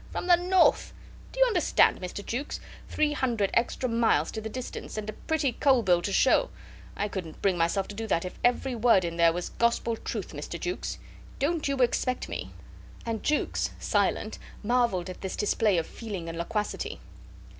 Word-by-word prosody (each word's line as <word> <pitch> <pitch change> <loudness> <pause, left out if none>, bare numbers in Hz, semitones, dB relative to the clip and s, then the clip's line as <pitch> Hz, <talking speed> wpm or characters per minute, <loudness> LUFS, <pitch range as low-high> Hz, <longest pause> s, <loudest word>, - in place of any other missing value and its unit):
From - - -3
the 355 -1 +7
north! 360 +1 +3 0.4
Do - - -8
you - - +7
understand, 375 - +3
Mr. 185 +2 -6
Jukes? 260 +5 -3 0.3
Three 305 -1 +1
hundred 235 -8 0
extra 245 +2 +1
miles 230 -10 +2
to 220 - -5
the 220 - -5
distance, 250 -2 -6
and 215 -1 -4
a 215 - -4
pretty 310 +1 -1
coal 260 0 +3
bill 175 -3 +3
to 200 - -2
show. 270 - +4 0.5
I 205 - 0
couldn't 180 -6 -7
bring 195 -2 +3
myself 175 +3 +1
to - - -6
do 225 +1 -4
that 170 -4 +1
if 180 - -7
every 250 +2 +2
word 230 -6 +4
in 170 0 -4
there 170 -1 +5
was 175 +1 -4
gospel 235 0 +1
truth, - - -5
Mr. - - -6
Jukes. 360 - -3 0.4
Don't 305 +3 0
you 275 0 0
expect 250 +1 +1
me... - - -5 0.3
." - - -19
And 230 -2 -2
Jukes, 300 - 0
silent, - - 0 0.2
marvelled 235 -6 +1
at 185 - -8
this 190 - -4
display 210 -2 +2
of 165 - 0
feeling 200 -6 -6
and 165 - -5
loquacity. 210 +5 -3
225 Hz, 190 wpm, -28 LUFS, 190-260 Hz, 0.5 s, the